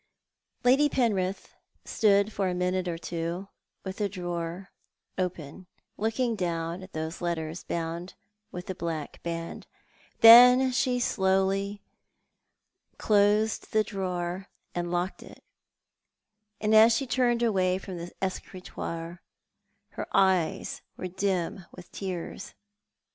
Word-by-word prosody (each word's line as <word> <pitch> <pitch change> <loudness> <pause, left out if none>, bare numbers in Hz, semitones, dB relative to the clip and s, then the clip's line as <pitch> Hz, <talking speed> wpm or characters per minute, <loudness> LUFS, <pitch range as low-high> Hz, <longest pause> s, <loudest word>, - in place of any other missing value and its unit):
Lady 270 +4 +5
Penrith 200 -8 -1 0.3
stood 205 0 +2
for 195 -2 0
a 180 - -2
minute 180 0 -1
or 170 -1 -2
so 170 +3 -4 0.3
with 190 0 -6
the 205 -2 -1
drawer 175 0 -5 0.4
open, 180 -1 -4 0.3
looking 225 +2 0
down 170 -2 -3
at 190 0 -12
those 160 +3 -5
letters 165 -1 -3
bound 170 +2 -4 0.4
with 180 0 -7
the 190 - -4
black 165 -4 -5
band; 165 0 -5 0.5
the 225 - +9
n 250 +3 +9
she 250 -1 +1
slowly 195 -1 0 1.1
closed 210 +2 +2
the 215 0 +4
drawer 185 -1 -4 0.3
and 175 0 -3
locked 180 +1 -2
it, - - -14 1.2
and 215 0 +1
as 220 +1 +7
she 275 - -2
turned 240 -2 +1
away 185 -5 +2
from 190 -1 -7
the 170 +1 -7
escritoire 175 -2 -5 0.7
her - - -6
eyes 190 -4 +2 0.2
were 185 - -4
dim 185 0 -2
with 175 - -13
tears. 185 -1 -6
190 Hz, 120 wpm, -28 LUFS, 175-210 Hz, 1.2 s, the